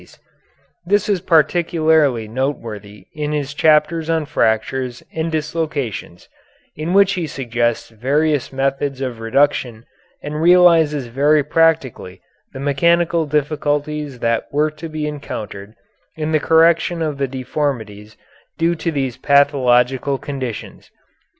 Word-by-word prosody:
This 205 +3 +1
is 200 -4 0
particularly 160 - +2
noteworthy 110 -5 -5
in 150 0 -3
his 145 -1 -3
chapters 155 +2 +2
on 160 -2 0
fractures 125 -1 -1
and 160 +1 -2
dislocations, 150 - -4 0.5
in 160 +4 -3
which 195 0 +5
he 175 -3 -3
suggests 120 -4 -2
various 140 +6 0
methods 135 0 -2
of 125 -4 -4
reduction 120 -1 0 0.4
and 150 +1 -4
realizes 165 -5 +4
very 145 +5 +2
practically 150 - 0 0.3
the 135 - -9
mechanical 165 +3 +1
difficulties 150 -1 -2
that 115 -1 -1
were 150 +2 +1
to 155 +2 -9
be 155 -1 -4
encountered 110 -8 -7 0.4
in 155 0 -3
the 155 - +3
correction 165 +2 +3
of 150 -3 -3
the 135 - 0
deformities 125 -6 -4 0.4
due 165 +1 +2
to 165 0 -3
these 135 -5 -2
pathological 135 -1 +2
conditions. 130 -5 -7
145 Hz, 120 wpm, -19 LUFS, 125-160 Hz, 0.5 s, which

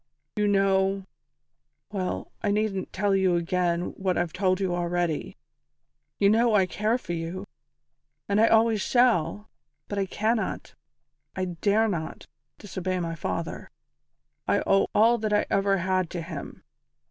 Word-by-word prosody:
"You 210 -1 +1
know 195 -1 +2 0.9
well, 190 -3 -3
I 205 - 0
needn't 205 -2 -1
tell 200 +1 0
you 190 -2 +3
again 175 0 0
what 185 -2 +1
I've 175 -2 -1
told 185 0 +1
you 190 -2 0
already. 175 -2 -2 0.8
You 200 - +3
know 225 +2 +4
I 195 -2 +5
care 215 +5 0
for 175 -8 -6
you, 170 +4 -4 0.8
and 205 +1 +2
I 225 - +6
always 225 -2 +4
shall, 220 -4 +2 0.4
but 205 - -3
I 195 - 0
cannot 220 +3 -1 0.6
I 185 - -1
dare 200 +5 +1
not 165 -6 -4 0.3
disobey 185 -2 -3
my 165 -1 -3
father. 165 +1 -4 0.8
I - - +2
owe 195 0 +3
all 230 +3 +5
that 215 -1 -1
I 210 - +3
ever 195 0 +2
had 185 -1 0
to 175 -2 -5
him. 160 -3 -8
195 Hz, 145 wpm, -26 LUFS, 175-210 Hz, 0.9 s, I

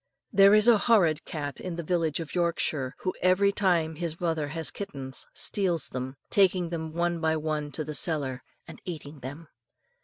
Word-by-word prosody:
There 200 +1 +7
is 215 +2 +5
a 230 -3 +7
horrid 175 -10 +3
cat 145 -3 -5
in 175 -2 -5
a - - -3
village 165 -2 0
in 165 - -3
Yorkshire, 160 -6 0
who, 185 - -1
every 185 +2 +4
time 175 -5 +1
his 165 -1 -4
mother 160 -4 -1
has 160 +2 -3
kittens, 135 -10 -6
steals 180 -5 +1
them, 130 +1 -5 0.2
taking 185 -3 +3
them 160 -2 -4
one 170 +1 -1
by 160 -1 +2
one 150 -1 -3
to 155 - 0
the 155 +1 -6
cellar, 140 -5 0 0.3
and - - -11
eating 155 -4 -7
them. 145 +6 -8
165 Hz, 180 wpm, -27 LUFS, 150-180 Hz, 0.3 s, There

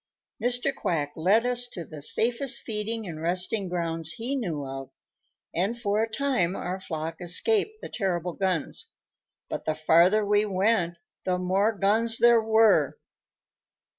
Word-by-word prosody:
Mr. 245 +3 +1
Quack 145 - -2
led 200 +8 +3
us 245 0 0
to 175 -8 -8
the 155 -2 -10
safest 235 - 0
feeding 220 +1 -3
and 160 -4 -7
resting 180 +4 -1
grounds 165 -2 -2
he 245 +5 -3
knew 170 - -3
of, 135 0 -7 0.6
and 200 +7 -1
for 210 -2 0
a 225 - -1
time 220 -8 0
our 185 +2 -4
flock 160 -3 -5
escaped 425 - +2
the - - -7
terrible 180 -4 -2
guns. 185 -5 -1 0.5
But - - -5
the 155 - 0
farther 170 +7 +4
we 205 +1 +3
went, 190 -3 +1 0.3
the 180 -1 0
more 190 +4 +2
guns 220 +3 +1
there 235 -1 +6
were." 220 - +4
195 Hz, 145 wpm, -26 LUFS, 170-225 Hz, 0.6 s, there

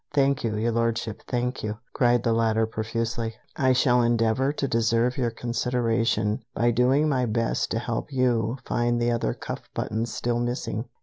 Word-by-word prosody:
"Thank 140 -1 +2
you, 110 -2 -1
Your 115 +2 0
Lordship, 115 -2 -1
thank 125 +1 -1
you!" 105 0 -3 0.2
cried 120 -1 +3
the 115 - +2
latter 115 -1 +2
profusely, 115 +1 -3 0.2
"I 130 -1 +3
shall 125 -1 +4
endeavor 120 +3 +2
to 145 -2 -2
deserve 115 +1 +2
your 125 -4 0
consideration 115 -2 0
by 120 0 +3
doing 130 +6 +3
my 130 -4 +1
best 115 +1 0
to - - -1
help 120 +4 -3
you 125 -2 +1
find 120 0 +1
the 120 0 +1
other 115 - 0
cuff - - -7
buttons 110 +2 -2
still 120 +1 -1
missing." 120 -2 -2
120 Hz, 170 wpm, -25 LUFS, 115-125 Hz, 0.2 s, shall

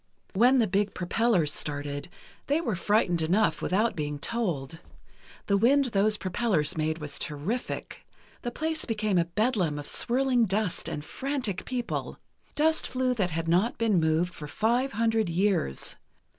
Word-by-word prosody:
When 245 +7 +5
the 235 - +4
big 200 +1 0
propellers 180 -4 +1
started, 145 +2 -4 0.4
they 290 +3 +2
were 230 - -1
frightened 180 -2 +2
enough 185 +7 +2
without 215 +5 +1
being 150 -2 -3
told. 165 - -2 0.7
The 200 - +2
wind 270 +7 +4
those 210 +2 +3
propellers 185 -6 0
made 155 0 -1
was 150 -3 -4
terrific. 170 - -4 0.4
The 240 - -3
place 315 +5 -2
became 215 -5 0
a 170 - +2
bedlam 185 -4 0
of 145 - -6
swirling 250 -1 +2
dust 195 -1 -1
and 150 - -5
frantic 260 - -3
people. 250 -2 -3 0.4
Dust 315 +1 +2
flew 255 0 0
that 200 -7 0
had 165 0 -3
not 180 +8 +2
been 220 -5 +2
moved 160 +3 +1
for 150 - -8
five 240 - 0
hundred 225 -3 +1
years. 175 - 0
200 Hz, 150 wpm, -28 LUFS, 165-235 Hz, 0.7 s, When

